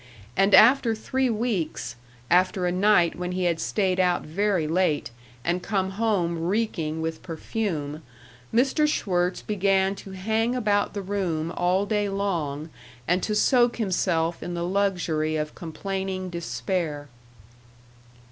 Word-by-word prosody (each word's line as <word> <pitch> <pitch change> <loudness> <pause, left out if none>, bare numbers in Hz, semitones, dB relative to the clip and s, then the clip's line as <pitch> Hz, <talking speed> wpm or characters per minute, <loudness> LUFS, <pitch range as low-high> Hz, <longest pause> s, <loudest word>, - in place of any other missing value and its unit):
And 195 +4 +5
after 235 0 +6
three 260 +4 -1
weeks 195 - -2 0.4
after 185 +1 +3
a 175 - +1
night 180 -2 +3
when 180 0 -4
he 185 0 -1
had 170 -2 +1
stayed 190 -3 0
out 180 -1 +2
very 185 +1 0
late 160 -5 +1 0.3
and 175 +2 0
come 190 -1 -1
home 190 -5 0
reeking 175 -7 -1
with 160 0 -3
perfume 160 -4 -4 0.5
Mr. 270 +5 +3
Schwirtz 180 -9 0
began 195 -1 +2
to 195 0 -10
hang 220 +5 0
about 210 -4 +1
the 200 - -3
room 175 -5 -2
all 180 +3 +1
day 205 -1 0
long 165 -7 -2 0.4
and 180 +2 +2
to 210 - -1
soak 240 +1 +4
himself 175 -5 0
in 175 - -4
the 170 0 -2
luxury 180 -5 0
of 150 0 -2
complaining 190 +2 -4
despair. 170 -3 -3
185 Hz, 135 wpm, -25 LUFS, 170-205 Hz, 0.5 s, after